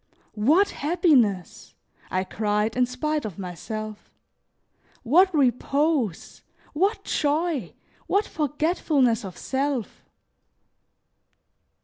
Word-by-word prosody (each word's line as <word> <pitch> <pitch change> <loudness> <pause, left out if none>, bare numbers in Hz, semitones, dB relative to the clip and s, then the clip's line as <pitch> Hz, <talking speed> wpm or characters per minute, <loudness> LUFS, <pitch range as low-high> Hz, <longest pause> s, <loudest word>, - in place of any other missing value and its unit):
"What 305 - +3
happiness!" 280 - +1 0.3
I 185 0 0
cried 210 +2 -1
in 250 0 +2
spite 300 +4 -2
of 205 -6 -6
myself. 215 +3 -6 0.9
"What 355 +10 +5
repose! 275 - 0 0.3
What 395 +6 0
joy! 300 - -1 0.3
What 405 +2 +2
forgetfulness 295 -5 0
of 190 -3 -8
self!" 270 -3 -2
270 Hz, 80 wpm, -25 LUFS, 215-310 Hz, 0.9 s, What